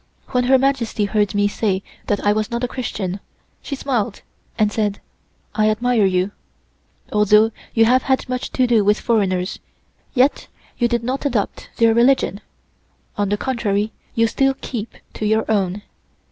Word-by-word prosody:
When 250 -1 +1
Her 265 +1 +5
Majesty 255 -5 0
heard 205 0 0
me 205 0 +3
say 200 -2 -1 0.2
that 205 -1 -1
I 205 - +4
was 215 0 -1
not 235 +1 -3
a - - +1
Christian, 205 -7 -4 0.4
she 280 - -5
smiled 240 -6 -2 0.3
and 210 -1 +2
said: 210 -2 -1 0.5
"I 215 -1 +2
admire 230 0 +2
you; 185 +1 0 0.8
although 210 +1 +5 0.2
you 225 -1 +5
have 255 +3 +4
had 265 0 +1
so - - -12
much 255 0 -3
to 255 - +3
do 235 -4 +3
with 210 +1 +3
foreigners, 190 -5 0 0.6
yet 260 +3 +2 0.3
you 240 - +3
did 235 -1 -1
not 265 +4 -1
adopt 235 -7 -2
their 230 -1 +4
religion. 235 -3 +3 0.7
On 205 -2 0
the 205 - +1
contrary, 215 -4 -1 0.2
you 230 - +4
still 270 +4 +1
keep 230 -3 -5 0.2
to 215 - -4
your 220 +1 +2
own. 200 -2 0
220 Hz, 165 wpm, -20 LUFS, 205-245 Hz, 0.8 s, Her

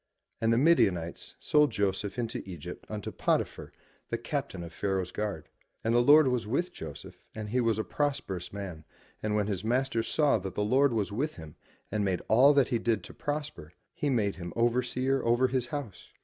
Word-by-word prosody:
And 115 0 +3
the 115 - +3
Midianites 95 - +2
sold 150 -1 +4
Joseph 100 +2 -1
into 115 -2 -2
Egypt 90 -2 -8
unto 105 -1 -5
Pot'i - - +1
phar, - - -12 0.4
the - - -1
Captain 90 -2 -4
of 85 -1 -9
Pharaoh's 95 -2 -1
guard. 100 -8 -4 0.4
And 115 - +1
the 120 - +5
Lord 145 +3 +7
was 125 -4 0
with 175 +10 -1
Joseph - - -9
and 105 -1 -5
he 125 +3 +1
was 115 -3 +2
a 110 - 0
prosperous 130 - -2
man 95 -6 -6 0.4
and 105 0 -1
when 105 -1 +2
his 100 -2 -3
master 125 +1 +1
saw 140 +1 +2
that 95 -1 -6
the 105 - 0
Lord 135 +5 +4
was 105 -3 -1
with 145 +9 -2
him 80 -3 -10 0.4
and 105 0 0
made 95 -3 -1
all 125 +7 +7
that 140 -3 +4
he 120 -3 +1
did 110 -4 0
to - - -10
prosper, 145 - -5 0.2
he 145 - -1
made 105 -6 +1
him 85 -2 -6
overseer 125 +3 +1
over 120 +2 +3
his 125 -1 -1
house. 135 -6 -6
115 Hz, 195 wpm, -29 LUFS, 95-130 Hz, 0.4 s, Lord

